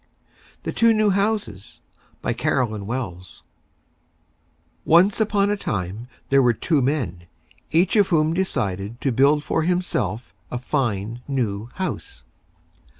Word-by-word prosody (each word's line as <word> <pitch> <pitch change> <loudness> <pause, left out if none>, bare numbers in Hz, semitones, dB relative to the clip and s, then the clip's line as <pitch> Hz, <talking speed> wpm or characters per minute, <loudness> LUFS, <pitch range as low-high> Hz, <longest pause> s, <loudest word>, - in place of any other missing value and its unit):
THE - - -2
TWO 230 -1 +4
NEW 215 -1 +3
HOUSES 195 - -2 0.4
BY - - 0
CAROLYN 110 -5 -1
WELLS 95 -8 -5 1.4
Once 185 +7 +4
on 205 -1 +2
a - - +2
Time, 105 - -4 0.2
there 140 0 +5
were 120 -2 +4
Two 150 +5 +1
Men, 115 - -2 0.4
each 175 +6 +2
of 205 -3 +5
whom 160 -1 +2
decided 105 - -2
to 135 - +1
build 140 +5 +3
for 160 - 0
himself 155 - -1 0.2
a 125 - -3
Fine, 120 -4 -2
New 115 -5 -2
House. 190 -1 -5
135 Hz, 125 wpm, -23 LUFS, 105-180 Hz, 1.4 s, there